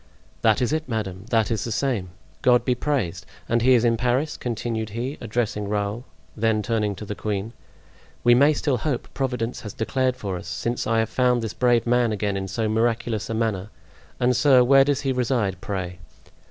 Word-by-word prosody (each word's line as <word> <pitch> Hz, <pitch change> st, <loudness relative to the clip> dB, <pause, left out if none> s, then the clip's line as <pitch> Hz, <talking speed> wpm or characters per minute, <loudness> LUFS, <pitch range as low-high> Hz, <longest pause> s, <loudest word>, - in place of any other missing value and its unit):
"That 110 Hz, +2 st, +3 dB
is 125 Hz, -, 0 dB
it, 155 Hz, -3 st, -2 dB
madame, 100 Hz, -4 st, -3 dB
that 115 Hz, -2 st, +2 dB
is 110 Hz, -, -1 dB
the 115 Hz, -, -4 dB
same. 110 Hz, -7 st, -1 dB, 0.3 s
God 125 Hz, -1 st, +4 dB
be 125 Hz, -, +3 dB
praised! 120 Hz, -, -2 dB, 0.2 s
And 115 Hz, 0 st, +1 dB
he 130 Hz, +2 st, +5 dB
is 120 Hz, 0 st, +3 dB
in 115 Hz, -1 st, +3 dB
Paris?" 125 Hz, +6 st, 0 dB
continued 115 Hz, -2 st, -3 dB
he, 130 Hz, +5 st, -3 dB
addressing 110 Hz, -2 st, -2 dB
Raoul; 105 Hz, +3 st, -2 dB, 0.3 s
then 110 Hz, -1 st, +1 dB
turning 105 Hz, -3 st, 0 dB
to 105 Hz, -, -8 dB
the 105 Hz, -, -4 dB
queen: 105 Hz, +1 st, -3 dB, 0.7 s
"We 120 Hz, -, +6 dB
may 140 Hz, +5 st, +5 dB
still 140 Hz, -3 st, 0 dB
hope. 130 Hz, -1 st, -2 dB
Providence 125 Hz, -3 st, -2 dB
has 105 Hz, -, -7 dB
declared 130 Hz, +3 st, 0 dB
for 100 Hz, -6 st, -4 dB
us, 90 Hz, -, -9 dB
since 115 Hz, +7 st, -2 dB
I 115 Hz, 0 st, +2 dB
have 110 Hz, -1 st, +1 dB
found 125 Hz, -1 st, +2 dB
this 110 Hz, -, -3 dB
brave 120 Hz, -2 st, +2 dB
man 120 Hz, -1 st, +2 dB
again 105 Hz, -1 st, -1 dB
in 95 Hz, 0 st, -3 dB
so 110 Hz, +4 st, -2 dB
miraculous 115 Hz, 0 st, 0 dB
a 115 Hz, -, -2 dB
manner. 110 Hz, -3 st, -1 dB, 0.5 s
And, 125 Hz, 0 st, +2 dB
sir, 130 Hz, -1 st, +5 dB
where 135 Hz, +2 st, +6 dB
does 140 Hz, 0 st, 0 dB
he 135 Hz, -, 0 dB
reside, 115 Hz, -7 st, 0 dB
pray?" 90 Hz, -3 st, -4 dB
115 Hz, 195 wpm, -24 LUFS, 105-125 Hz, 0.7 s, We